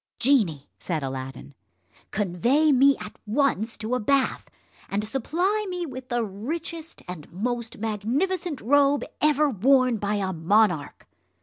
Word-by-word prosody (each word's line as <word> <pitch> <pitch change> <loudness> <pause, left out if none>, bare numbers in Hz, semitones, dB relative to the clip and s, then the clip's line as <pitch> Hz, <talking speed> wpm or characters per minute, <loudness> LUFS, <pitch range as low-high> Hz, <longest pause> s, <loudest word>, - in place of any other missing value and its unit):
"Genie," 220 - +2
said 160 -5 -3
Aladdin, 135 +1 -6 0.6
"convey 235 - +2
me 275 +1 +5
at - - -9
once 230 -2 0
to 220 +2 -3
a 250 - +1
bath, 270 +4 +1 0.4
and 200 +1 -1
supply 355 - 0
me 360 -1 -3
with 260 -3 -8
the 240 -1 0
richest 320 - -6
and 175 -4 -8
most 235 +4 -3
magnificent 275 - -1
robe 285 +4 +3 0.2
ever 300 0 +4
worn 255 +1 +3
by 205 0 -1
a 190 -2 -1
monarch." 175 -2 +1
240 Hz, 130 wpm, -25 LUFS, 200-285 Hz, 0.6 s, me